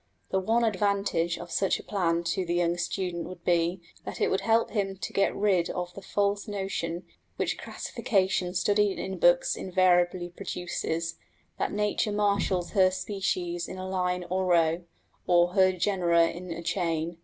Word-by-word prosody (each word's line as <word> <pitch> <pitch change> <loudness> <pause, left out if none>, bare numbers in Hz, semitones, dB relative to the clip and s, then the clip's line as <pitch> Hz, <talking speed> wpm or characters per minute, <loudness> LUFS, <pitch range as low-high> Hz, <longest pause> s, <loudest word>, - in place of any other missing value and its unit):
The 190 - +2
one 225 +5 +1
advantage 200 -5 +1
of - - -9
such 195 -2 +1
a - - -10
plan 170 -4 0
to 170 +3 -1
the 175 -1 -2
young 175 -1 +2
student 175 -1 -3
would 180 -2 -10
be, 175 +1 +1 0.2
that - - -7
it - - +2
would 190 - +1
help 230 0 +2
him 195 -3 -1
to 175 - -6
get 195 - +2
rid 195 -4 +2
of 180 0 -4
the 200 - -9
false 200 +2 0
notion, 190 -4 -3 0.3
which - - -2
classification 185 -3 -1
studied 205 +1 +2
in 190 - -4
books - - +4
invariably 180 -1 +2
produces, 170 -1 -4 0.4
that - - 0
nature 210 +1 0
marshals 200 -3 +1
her 190 -2 +5
species 185 -2 -2
in 185 - -7
a 185 0 -5
line 180 -1 -1
or 185 +1 -1
row, 170 0 +2 0.4
or 175 0 +5
her 185 0 +4
genera 175 -3 +2
in 180 +2 -8
a 170 0 -5
chain. 165 -1 -1
185 Hz, 165 wpm, -28 LUFS, 175-195 Hz, 0.4 s, her